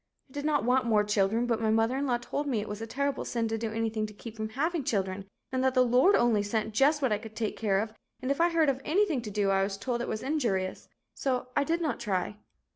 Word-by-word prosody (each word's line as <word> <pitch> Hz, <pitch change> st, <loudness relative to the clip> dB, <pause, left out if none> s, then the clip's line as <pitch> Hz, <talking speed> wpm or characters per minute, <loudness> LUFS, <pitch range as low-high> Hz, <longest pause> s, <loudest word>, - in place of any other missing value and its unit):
I -, -, -18 dB
did 285 Hz, 0 st, -4 dB
not 300 Hz, -1 st, +2 dB
want 250 Hz, 0 st, +2 dB
more 215 Hz, -2 st, +4 dB
children, 210 Hz, +3 st, +1 dB
but 230 Hz, -2 st, 0 dB
my 220 Hz, -, +1 dB
mother 225 Hz, +3 st, +2 dB
in 275 Hz, +1 st, -1 dB
law 245 Hz, -2 st, +2 dB
told 285 Hz, +4 st, -4 dB
me 245 Hz, -6 st, 0 dB
it 210 Hz, -, -4 dB
was 210 Hz, +1 st, -6 dB
a 225 Hz, -, -4 dB
terrible 280 Hz, +4 st, -1 dB
sin 230 Hz, -1 st, -1 dB
to 225 Hz, -, -1 dB
do 225 Hz, -1 st, -3 dB
anything 220 Hz, -1 st, -1 dB
to 210 Hz, -, -12 dB
keep 225 Hz, +1 st, -9 dB
from 220 Hz, 0 st, -4 dB
having 310 Hz, +7 st, -1 dB
children 195 Hz, -4 st, -1 dB, 0.3 s
and 260 Hz, 0 st, 0 dB
that 260 Hz, 0 st, +2 dB
the 255 Hz, 0 st, +5 dB
Lord 255 Hz, +11 st, +5 dB
only 235 Hz, -3 st, +3 dB
sent 215 Hz, +1 st, -2 dB
just 285 Hz, +5 st, +3 dB
what 260 Hz, -, +2 dB
I 210 Hz, -, +1 dB
could 220 Hz, 0 st, -11 dB
take 220 Hz, -2 st, -2 dB
care 205 Hz, -3 st, +1 dB
of 215 Hz, +1 st, -3 dB, 0.3 s
and 255 Hz, +2 st, -2 dB
if 280 Hz, -, 0 dB
I 340 Hz, -, +5 dB
heard 330 Hz, -2 st, +3 dB
of 270 Hz, -1 st, 0 dB
anything 335 Hz, -4 st, +1 dB
to 220 Hz, -, -6 dB
do 200 Hz, -1 st, +1 dB
I 195 Hz, 0 st, +3 dB
was 195 Hz, 0 st, -1 dB
told 235 Hz, +3 st, -2 dB
it -, -, -3 dB
was 215 Hz, -, -3 dB
injurious, 230 Hz, -11 st, -1 dB, 0.2 s
so 250 Hz, -2 st, -2 dB
I 285 Hz, -, +3 dB
did 335 Hz, +3 st, 0 dB
not 315 Hz, -4 st, -1 dB
try. 195 Hz, +1 st, -2 dB
230 Hz, 275 wpm, -29 LUFS, 215-270 Hz, 0.3 s, the